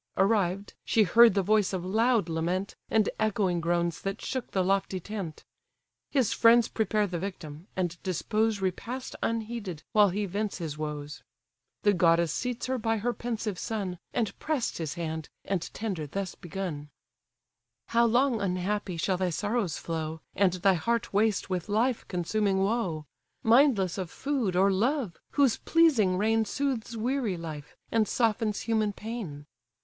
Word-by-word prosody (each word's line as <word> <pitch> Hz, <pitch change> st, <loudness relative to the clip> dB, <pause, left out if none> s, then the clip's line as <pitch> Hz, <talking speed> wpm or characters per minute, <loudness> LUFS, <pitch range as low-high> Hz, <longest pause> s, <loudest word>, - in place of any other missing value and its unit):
Arrived, 195 Hz, -1 st, +1 dB
she 220 Hz, -, +3 dB
heard 225 Hz, +3 st, +6 dB
the 195 Hz, -, +2 dB
voice 210 Hz, 0 st, +2 dB
of 180 Hz, -1 st, -2 dB
loud 225 Hz, 0 st, +2 dB
lament, 170 Hz, +4 st, -2 dB
And 215 Hz, -2 st, +3 dB
echoing 195 Hz, -5 st, +1 dB
groans 170 Hz, 0 st, 0 dB
that 195 Hz, +2 st, -3 dB
shook 260 Hz, -3 st, -4 dB
the 190 Hz, -, +1 dB
lofty 195 Hz, 0 st, 0 dB
tent: 190 Hz, -4 st, -6 dB, 0.6 s
His 260 Hz, -7 st, +2 dB
friends 230 Hz, 0 st, +6 dB
prepare 215 Hz, -1 st, +1 dB
the 175 Hz, -3 st, -3 dB
victim, 170 Hz, -3 st, -7 dB
and 180 Hz, -2 st, -2 dB
dispose 210 Hz, +3 st, 0 dB
Repast 235 Hz, +8 st, -3 dB
unheeded, 220 Hz, -7 st, -3 dB
while 210 Hz, -3 st, +5 dB
he 205 Hz, +3 st, -1 dB
vents 205 Hz, +2 st, -2 dB
his 160 Hz, -5 st, -4 dB
woes; 150 Hz, -2 st, -5 dB, 0.6 s
The 205 Hz, -, +5 dB
goddess 170 Hz, -2 st, +3 dB
seats 250 Hz, -2 st, -2 dB
her 260 Hz, 0 st, -1 dB
by 225 Hz, 0 st, 0 dB
her 240 Hz, +3 st, -1 dB
pensive 225 Hz, -6 st, -3 dB
son, 195 Hz, -6 st, -3 dB, 0.2 s
She 230 Hz, -4 st, +1 dB
press'd 295 Hz, -, -1 dB
his 160 Hz, -3 st, -3 dB
hand, 160 Hz, -2 st, -4 dB, 0.2 s
and 190 Hz, -4 st, -2 dB
tender 190 Hz, -9 st, -4 dB
thus 195 Hz, +4 st, -4 dB
begun: 175 Hz, -5 st, -5 dB, 1.0 s
"How 235 Hz, 0 st, +4 dB
long, 245 Hz, 0 st, +2 dB
unhappy! 185 Hz, 0 st, -1 dB
shall 185 Hz, +3 st, 0 dB
thy 185 Hz, 0 st, 0 dB
sorrows 205 Hz, 0 st, -1 dB
flow, 160 Hz, -1 st, -4 dB, 0.2 s
And 190 Hz, -3 st, +3 dB
thy 190 Hz, +1 st, +3 dB
heart 230 Hz, +7 st, -1 dB
waste 210 Hz, 0 st, +2 dB
with 185 Hz, +2 st, -2 dB
life 230 Hz, +4 st, +1 dB
consuming 190 Hz, +2 st, 0 dB
woe: 195 Hz, -8 st, -1 dB, 0.4 s
Mindless 225 Hz, -, +4 dB
of 185 Hz, -3 st, -3 dB
food, 260 Hz, -, -1 dB
or 195 Hz, +2 st, +4 dB
love, 230 Hz, -, 0 dB
whose 275 Hz, -5 st, +3 dB
pleasing 260 Hz, -, +3 dB
reign 220 Hz, +3 st, +2 dB
Soothes 235 Hz, -1 st, -2 dB
weary 235 Hz, -4 st, -1 dB
life, 155 Hz, -3 st, -8 dB
and 220 Hz, -2 st, +2 dB
softens 225 Hz, -2 st, +1 dB
human 220 Hz, -2 st, 0 dB
pain? 200 Hz, -11 st, -6 dB
200 Hz, 155 wpm, -28 LUFS, 180-225 Hz, 1.0 s, heard